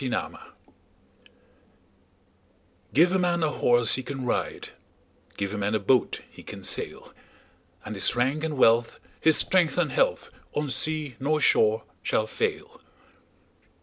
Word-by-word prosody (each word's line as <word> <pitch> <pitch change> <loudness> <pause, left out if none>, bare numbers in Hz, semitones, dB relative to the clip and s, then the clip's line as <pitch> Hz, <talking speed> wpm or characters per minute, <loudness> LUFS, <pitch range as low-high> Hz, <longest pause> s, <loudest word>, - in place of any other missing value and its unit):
Gifts 130 -2 -1 2.8
GIVE 170 +5 +5
a 190 - +2
man 175 -2 +1
a 155 - +2
horse 120 -4 +2
he 130 - +1
can 135 -1 -6
ride, 125 - -2 0.7
Give 100 0 -3
a 105 - -3
man 105 +2 0
a - - +1
boat 125 +5 +1
he - - -15
can - - -10
sail; - - -4 0.7
And 110 - -5
his 100 +3 0
rank 135 +6 0
and 155 -3 -2
wealth, 115 -1 +3 0.2
his 160 -1 +4
strength 180 -4 +2
and - - +1
health, - - 0 0.2
On 150 -2 -1
sea 155 -3 -3
nor 150 +3 +1
shore 450 - +3 0.2
shall - - 0
fail. 450 +2 -4
150 Hz, 140 wpm, -26 LUFS, 120-175 Hz, 2.8 s, GIVE